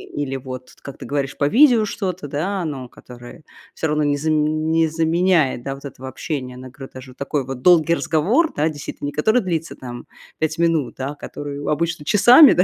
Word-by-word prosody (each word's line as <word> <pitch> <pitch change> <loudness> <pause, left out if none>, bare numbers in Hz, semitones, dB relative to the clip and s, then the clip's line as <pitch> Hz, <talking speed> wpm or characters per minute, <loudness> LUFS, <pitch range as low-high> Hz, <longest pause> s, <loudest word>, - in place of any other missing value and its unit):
или 140 -2 -2
вот, 130 -1 -8
как 140 - -9
ты - - -9
говоришь, 140 -1 -2
по 145 - +2
видео 245 - +6
что-то, 185 -6 -4
да, 180 +7 -2
но 135 -5 -5
которое 120 +7 -13 0.3
всё 160 - -1
равно 150 0 +1
не 145 -1 +2
заме 155 +1 +1
не 160 +1 +1
заменяет, 160 -4 +2
да, 135 +1 -4
вот 135 - -14
этого 135 -1 -8
общения. 130 -1 -5
Она 130 +1 -10
говорит, 135 +1 -11
даже 130 0 -10
такой 140 +1 -3
вот 130 -1 -6
долгий 170 -1 +5
разговор, 215 - +1
да, 155 +2 +1
действительно, 145 -1 -6
не - - -3
который 220 +12 +2
длится 165 -3 -3
там 120 -2 -9 0.3
5 155 0 -1
минут, 165 -5 +1
да, 135 +1 -4
а 145 - -7
который 145 0 -7
обычно 165 0 -1
часами, 245 - +8
да, 180 - +4
150 Hz, 200 wpm, -21 LUFS, 135-170 Hz, 0.3 s, часами